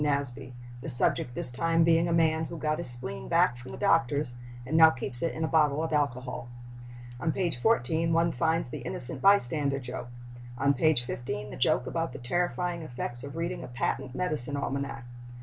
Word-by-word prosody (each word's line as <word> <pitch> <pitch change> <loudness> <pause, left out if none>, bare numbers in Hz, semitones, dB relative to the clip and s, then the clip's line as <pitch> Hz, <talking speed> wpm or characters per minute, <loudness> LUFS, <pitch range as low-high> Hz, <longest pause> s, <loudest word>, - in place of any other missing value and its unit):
Nasby, 140 -3 -2 0.3
the 160 - -6
subject 120 -1 0
this 125 - +2
time 165 +6 +1
being 165 +1 +3
a - - -1
man 160 -1 +2
"who 170 - -7
got 155 0 -1
his 170 - +5
spleen 65 - +4
back 115 - +3
from 120 +1 -11
the - - -8
doctor's 145 -4 +1 0.3
and 145 +5 -3
now 160 0 +8
keeps 130 -4 -4
it 165 - 0
in 160 - -4
a - - +1
bottle 155 -1 +2
of 160 - -3
alcohol." 125 -4 -2 0.7
On 160 +4 0
page 170 -8 -2
14 165 - +1
one 165 +1 +2
finds 160 -4 0
the 150 - -5
innocent 125 0 +2
bystander 145 -7 +3
joke; 125 -2 -7 0.5
on 140 +2 +2
page 140 -2 +2
15 120 -4 -5
the - - -7
joke 125 0 +1
about 165 +5 -3
the - - -7
terrifying 175 +6 -2
effects 120 -4 -6
of 140 +1 -8
reading 170 +1 -3
a - - -7
patent 130 +1 -3
medicine 150 -5 -2
almanac. 140 -3 -4
145 Hz, 190 wpm, -28 LUFS, 125-165 Hz, 0.7 s, now